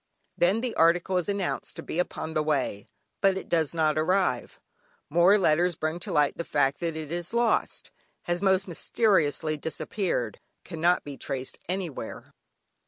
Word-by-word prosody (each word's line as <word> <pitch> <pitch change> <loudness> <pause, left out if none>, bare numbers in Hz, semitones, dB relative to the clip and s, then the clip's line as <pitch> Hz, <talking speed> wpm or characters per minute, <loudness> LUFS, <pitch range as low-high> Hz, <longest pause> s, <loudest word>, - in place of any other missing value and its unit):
Then 190 +6 +2
the 250 -2 -2
article 175 +3 +3
is 180 +2 -1
announced 200 -2 -2
to - - -7
be 165 - -4
upon 160 -2 -2
the 155 - +1
way, 140 -9 -1 0.3
but 195 -2 +3
it - - -6
does 160 -3 +1
not 155 -1 +2
arrive. 180 -6 0 0.5
More 175 +6 +6
letters 175 -1 +2
bring 155 +2 -2
to - - -5
light 145 -1 +2
the 170 - -2
fact 140 -3 +1
that 165 -2 -2
it 155 -1 -6
is 175 +5 -3
lost; 235 -1 0 0.3
has 175 0 -2
most 190 -1 +2
mysteriously 160 -4 +1
disappeared; 160 - -2 0.2
cannot 175 +1 +1
be 140 -2 -8
traced 130 -1 -5
anywhere. 175 -11 -5
170 Hz, 160 wpm, -27 LUFS, 155-185 Hz, 0.5 s, More